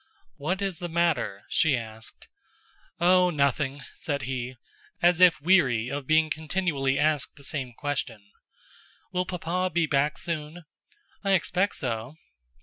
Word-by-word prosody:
"What 185 +7 -2
is 190 -4 -2
the 175 - -4
matter?" 160 -12 0
she 145 -5 +2
asked. 110 -1 -9 0.7
"Oh, 180 +1 +5
nothing," 140 -2 0
said 145 -3 -3
he, 130 -1 -4 0.4
as 175 0 +3
if 180 -3 +7
weary 140 -9 +3
of 140 -2 -4
being 155 0 +3
continually 155 -4 0
asked 150 -1 +1
the 140 - -15
same 130 -3 -3
question. 120 -5 -4 0.9
"Will 180 -1 0
Papa 180 +1 -1
be 170 0 +2
back 145 0 +1
soon?" 165 0 -4 0.6
"I 195 -1 +2
expect 190 +2 +1
so." 120 +1 -3
155 Hz, 135 wpm, -27 LUFS, 135-175 Hz, 0.9 s, if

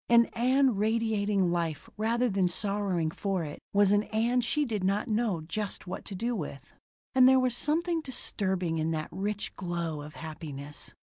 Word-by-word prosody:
An 235 0 +7
Ann 255 -1 +3
radiating 210 -3 +1
life 165 -4 -2
rather 230 +3 +1
than 195 -4 +2
sorrowing 190 -3 -1
for 190 -1 -2
it 150 -1 -6
was 200 -1 +4
an 205 +1 +3
Ann 235 +3 +1
she 295 +5 +1
did 215 -6 -2
not 200 +5 +1
know 215 -6 0
just 195 +6 -4
what 185 +1 -6
to 195 - -6
do 235 +5 -1
with. 145 - -6 0.4
And 255 0 +7
there 265 0 +6
was 255 -2 +2
something 330 +4 +1
disturbing 190 - -1
in 155 +1 0
that 155 -1 -2
rich 205 +3 -3
glow 170 -4 -3
of 150 +1 -10
happiness. 150 -3 -7
200 Hz, 175 wpm, -29 LUFS, 170-235 Hz, 0.4 s, An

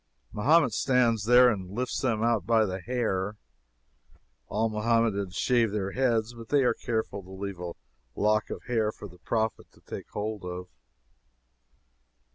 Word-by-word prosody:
Mahomet 130 +3 +4
stands 120 -5 +2
there 125 +2 +7
and 95 -4 -4
lifts 125 +1 -2
them 115 -4 0
out 115 -4 +2
by 115 -2 +4
the 95 -1 -3
hair. 105 -3 -1 1.1
All 110 +2 0
Mohammedans 105 -3 0
shave 120 -4 +2
their 100 -2 -2
heads, 120 -2 +1
but 115 -1 -11
they 145 -2 +4
are 125 - +3
careful 110 -4 -3
to 95 - -16
leave 95 -1 -6
a 90 -1 -5 0.4
lock 105 +1 +1
of - - -6
hair 110 -3 0
for 105 - -10
the 90 -1 -17
Prophet 110 +5 -1
to - - -22
take - - -8
hold 105 -1 -4
of. 90 0 -6
110 Hz, 155 wpm, -28 LUFS, 100-120 Hz, 1.1 s, there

